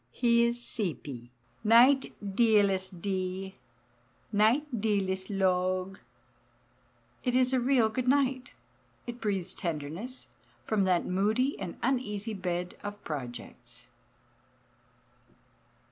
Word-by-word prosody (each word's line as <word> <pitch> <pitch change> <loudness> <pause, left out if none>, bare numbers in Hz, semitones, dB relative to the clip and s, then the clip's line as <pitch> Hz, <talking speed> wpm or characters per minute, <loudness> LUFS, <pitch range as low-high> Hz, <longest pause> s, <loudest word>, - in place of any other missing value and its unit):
He 235 - +3
is 235 0 0
"seepy." 150 - -4 0.3
"Nite, 245 +5 +5 0.2
dealest 195 -5 +2
dea, 190 -1 -2 0.8
nite 220 +8 +3 0.2
dealest 190 -3 0
logue." 185 -1 0 1.2
It 250 -1 0
is 255 0 +3
a 260 - +4
real 245 -2 +3
good 245 +3 -3
night. 260 -2 +1 0.5
It 240 0 -7
breathes 195 -5 -1
tenderness 170 - -5 0.4
from 210 -3 +1
that 180 -2 +2
moody 215 +9 +1
and 180 -3 -6
uneasy 225 -4 -1
bed 180 -2 -3
of 205 0 -7
projects. 125 -6 -7
205 Hz, 100 wpm, -29 LUFS, 185-240 Hz, 1.2 s, Nite